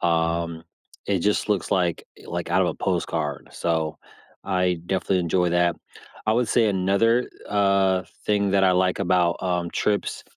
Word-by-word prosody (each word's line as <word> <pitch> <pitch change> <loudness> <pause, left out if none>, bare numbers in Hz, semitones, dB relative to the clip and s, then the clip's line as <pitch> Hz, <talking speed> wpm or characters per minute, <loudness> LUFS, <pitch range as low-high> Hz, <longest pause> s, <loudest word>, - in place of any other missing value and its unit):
Um, 85 -1 0 0.4
it 100 -3 0
just 105 +3 0
looks 100 -5 0
like 90 -3 0 0.2
like - - -4
out - - +3
of - - +1
a - - -3
postcard, 75 -3 -2
so 80 -2 -1 0.5
I 90 -3 0
definitely 95 0 0
enjoy 90 +1 +1
that. 85 0 +2 0.5
I 110 - +3
would 120 -1 +1
say 115 -2 +3
another, 100 +6 +2 0.2
uh, 100 -2 +2 0.2
thing 100 -1 +2
that 100 -1 +3
I 95 - +5
like 90 +1 +1
about, 90 -2 +2
um, 90 -2 -1
trips 105 -1 -1
90 Hz, 155 wpm, -24 LUFS, 85-100 Hz, 0.5 s, I